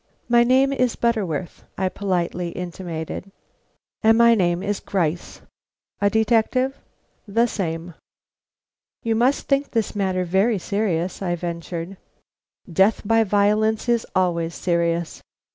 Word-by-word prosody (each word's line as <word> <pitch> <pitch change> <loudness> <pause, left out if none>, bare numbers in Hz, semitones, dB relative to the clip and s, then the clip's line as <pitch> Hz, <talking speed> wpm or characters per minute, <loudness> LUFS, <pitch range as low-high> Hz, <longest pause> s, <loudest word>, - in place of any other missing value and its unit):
"My 235 0 +5
name 265 +3 +3
is 255 -3 +1
Butterworth," 190 -9 -2
I 190 - +1
politely 180 -2 -2
intimated. 175 +1 -6 0.7
"And 225 0 +5
my 235 0 +6
name 175 -4 +1
is 205 -1 -1
Gryce." 175 -3 -2 0.6
"A 200 - +4
detective?" 230 +4 +2 0.5
"The 230 +4 +2
same." 170 -6 -4 1.1
"You 230 - +1
must 245 +5 +1
think 275 0 +1
this 225 -3 -1
matter 185 -2 0
very 195 +6 +2
serious," 190 -3 -2
I 175 -2 -1
ventured. 170 +1 -5 0.7
"Death 190 +5 +2
by 225 +1 +4
violence 215 +2 +2
is 235 -1 +1
always 170 -3 0
serious." 170 -1 -1
195 Hz, 120 wpm, -22 LUFS, 175-225 Hz, 1.1 s, my